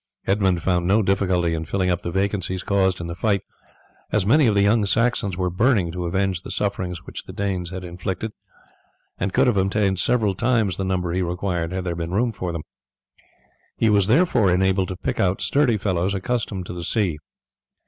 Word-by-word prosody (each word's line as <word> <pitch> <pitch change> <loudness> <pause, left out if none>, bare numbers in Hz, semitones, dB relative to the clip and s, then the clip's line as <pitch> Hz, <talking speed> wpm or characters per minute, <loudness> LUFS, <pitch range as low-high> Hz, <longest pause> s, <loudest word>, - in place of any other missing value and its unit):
Edmund 95 -3 +1
found 90 -2 +1
no 105 +3 +3
difficulty 95 -3 +1
in 80 0 -2
filling 90 +2 0
up 90 - -1
the - - -4
vacancies 95 0 -1
caused 95 -2 +1
in 85 - -5
the 85 - -4
fight, 100 +2 0 0.7
as 105 -3 +1
many 140 +5 +5
of 105 - +2
the 100 - +4
young 105 +2 +3
Saxons 105 -2 +1
were 90 -1 -1
burning 100 -3 +2
to 90 0 -4
avenge 95 0 0
the - - -9
sufferings 90 -4 -2
which - - -8
the - - -9
Danes 95 -4 -2
had 95 +1 -6
inflicted, 90 +4 -4 0.9
and 95 - -1
could - - +3
have 120 -5 +2
obtained 95 0 +1
several 105 0 +2
times 110 -3 +1
the 95 - -2
number 90 -2 -1
he 90 +2 0
required 90 -1 -2
had 95 0 -3
there 90 -2 -2
been 85 0 -4
room 115 +4 +1
for 90 -4 -4
them. 85 -2 -5 1.1
He 110 - +3
was 100 -2 +3
therefore 120 - +3
enabled 95 +1 +2
to 95 - -5
pick - - -3
out 95 0 +1
sturdy 140 -6 +2
fellows 95 -1 0
accustomed 100 -2 -2
to - - -7
the 85 -1 -6
sea. 90 -7 0
95 Hz, 200 wpm, -23 LUFS, 90-105 Hz, 1.1 s, many